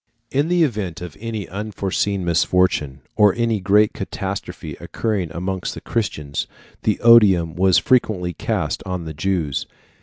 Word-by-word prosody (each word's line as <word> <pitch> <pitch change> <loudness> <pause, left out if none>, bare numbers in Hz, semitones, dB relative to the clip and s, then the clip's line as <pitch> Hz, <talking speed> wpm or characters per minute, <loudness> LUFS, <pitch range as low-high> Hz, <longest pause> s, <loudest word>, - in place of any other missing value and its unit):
In 140 +3 +1
the 175 0 +3
event 105 - -2
of 90 -3 -8
any 110 -4 -4
unforeseen 100 0 -2
misfortune, 85 -5 +1
or 105 -2 +5
any 115 -2 0
great 105 +2 +3
catastrophe - - -5
occurring 105 -7 -2
amongst 90 +2 -3
Christians, 75 -10 -2 0.3
the 105 - 0
odium 100 -9 +6
was 95 0 +4
frequently 100 -8 +2
cast - - -2
on 90 -2 -4
the 80 - -6
Jews. 80 -4 -1
95 Hz, 130 wpm, -21 LUFS, 85-110 Hz, 0.3 s, odium